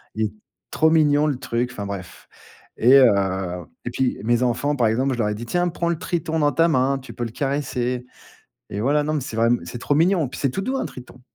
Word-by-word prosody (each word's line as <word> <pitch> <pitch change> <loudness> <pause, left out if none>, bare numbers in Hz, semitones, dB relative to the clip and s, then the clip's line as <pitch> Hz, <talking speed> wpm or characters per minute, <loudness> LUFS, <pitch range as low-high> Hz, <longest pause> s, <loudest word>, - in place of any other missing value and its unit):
Et 110 -1 -1 0.4
trop 160 - +3
mignon 150 -2 +4
le 140 -4 -1
truc, 120 0 -2
enfin 105 -5 -6
bref. 100 -3 -8 0.5
Et 125 +4 +5
heu, 130 - +8 0.8
et - - -3
puis, 130 -1 0
mes 120 +2 +2
enfants, 125 +4 0
par 120 -5 +2
exemple, 130 +5 +1
je 120 - -5
leur 105 -2 +1
ai 105 - -2
dit: 115 - -7
«Tiens, 175 +8 0
prends 170 0 -2
le 170 -2 -1
triton 160 -2 -2
dans 145 -1 +3
ta 165 +2 +3
main, 135 -2 +2
tu 130 - -11
peux 120 - -4
le 115 - -4
caresser» 125 -3 -2 0.7
et 100 +3 -4
voilà. 145 +5 +2
Non, 155 - -1
mais 150 - 0
c'est 120 -4 -6
vraim 115 +1 +3
c'est 120 - -7
trop 145 - 0
mignon. 165 -2 +3
Puis, - - -8
c'est 135 - +1
tout 195 - -3
doux 260 +6 -2
un - - -2
triton. 125 0 -12
130 Hz, 240 wpm, -22 LUFS, 120-150 Hz, 0.8 s, heu